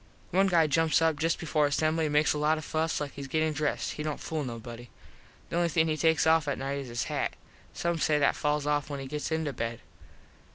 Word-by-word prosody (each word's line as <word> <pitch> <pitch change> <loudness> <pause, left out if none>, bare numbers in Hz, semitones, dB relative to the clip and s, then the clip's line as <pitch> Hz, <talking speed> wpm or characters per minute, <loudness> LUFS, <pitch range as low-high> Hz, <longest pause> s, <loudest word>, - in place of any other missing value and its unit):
One 195 +2 +4
guy 170 -4 +4
jumps 155 +1 +3
up 160 -2 +2
just 165 +2 +1
before 150 -2 +1
assembly 155 +2 +1
and 150 - -3
makes 150 +1 +4
a 150 - -3
lot 155 +1 +2
of 155 - -6
fuss 160 +1 -1
like 145 -2 -4
hes 140 -1 -7
gettin 155 +2 0
dressed. 150 -1 -1
He - - -6
dont 150 -1 -3
fool 155 -2 -3
nobody. 120 -1 -7 0.6
The - - -2
only 175 -1 +2
thing 160 0 +2
he 155 - 0
takes 160 0 +2
off 160 -1 +4
at 145 - -1
nite 135 +1 -3
is 135 - -6
his 120 -1 -2
hat. - - -2 0.4
Some 170 -1 -1
says 150 -1 +2
that - - +3
falls 150 0 0
off 150 0 0
when 140 -1 -4
he 135 - -6
gets 150 +3 -4
into 160 -3 -1
bed. 115 -1 -4
150 Hz, 240 wpm, -29 LUFS, 145-160 Hz, 0.6 s, One